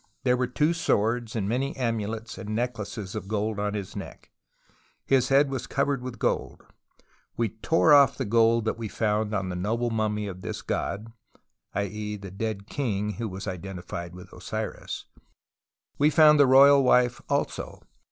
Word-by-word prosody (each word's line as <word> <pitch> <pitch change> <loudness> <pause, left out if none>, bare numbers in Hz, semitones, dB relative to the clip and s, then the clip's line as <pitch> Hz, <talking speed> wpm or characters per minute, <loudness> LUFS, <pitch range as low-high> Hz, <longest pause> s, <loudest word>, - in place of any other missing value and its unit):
There 125 -2 +3
were 125 0 0
two 150 +6 +1
swords 115 -6 0
and 100 -3 -1
many 130 +6 -1
amulets 115 -3 -3
and 110 +1 -4
neck 120 0 -2
laces 100 -2 -6
of 105 -4 -5
gold 105 0 -1
on 105 0 -1
his 100 -1 -5
neck: 100 - -9 0.7
his 130 -2 +2
head 135 +1 +4
was 130 -3 -4
covered 140 -1 0
with 125 -1 -6
gold. - - -2 0.7
We 115 -2 +1
tore 155 +9 +3
off 140 -1 +6
the 130 - -2
gold 115 +1 +3
that 110 - -2
we 115 - -3
76 - - -15
TUTANKHAMEN 105 -1 +1
found - - -1
on 95 -2 -2
the 90 - -4
noble 115 +6 -1
mummy 105 -1 -1
of 95 -2 -7
this - - -5
god 110 +3 -3 0.6
[i.e. 105 +1 -3
the 100 -2 -9
dead 100 0 -4
king 105 -6 -2
who 115 -2 -2
was 95 +1 -7
identified 90 -2 -6
with 90 - -12
Osiris]. - - -5 0.9
We 145 +1 +5
found 155 -1 +6
the 140 - +7
royal 140 +1 +7
wife 125 -1 +3
also. - - -2
110 Hz, 175 wpm, -26 LUFS, 105-125 Hz, 0.9 s, the